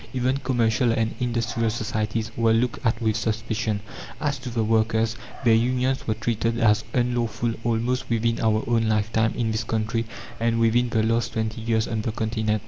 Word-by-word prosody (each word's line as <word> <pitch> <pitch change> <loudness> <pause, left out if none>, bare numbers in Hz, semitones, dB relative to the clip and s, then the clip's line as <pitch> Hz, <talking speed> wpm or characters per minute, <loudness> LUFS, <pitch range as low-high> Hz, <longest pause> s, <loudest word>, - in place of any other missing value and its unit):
Even 130 +1 +1
commercial 120 -3 +1
and 115 0 0
industrial 115 -1 0
societies 110 0 -2
were 115 -1 +3
looked 120 +1 0
at 115 -2 +1
with 110 -2 +1
suspicion. 110 -1 -1 0.4
As 140 -3 -1
to 130 -1 -6
the 115 -1 0
workers, 110 0 +2 0.3
their 115 - +6
unions 125 +3 +1
were 110 - +1
treated 115 +1 -1
as 105 -1 +4
unlawful 120 -1 0
almost 120 +2 0
within 115 0 +1
our 110 -1 +2
own 115 -2 +2
lifetime 110 +1 +1
in 115 -2 0
this 110 0 -1
country 115 +1 -1 0.3
and 115 0 +1
within 120 +2 +3
the 110 -1 +1
last 115 0 0
twenty 110 0 -2
years 110 0 +1
on 110 -2 -2
the 110 - -2
Continent. 110 -1 -1
115 Hz, 175 wpm, -24 LUFS, 110-120 Hz, 0.4 s, their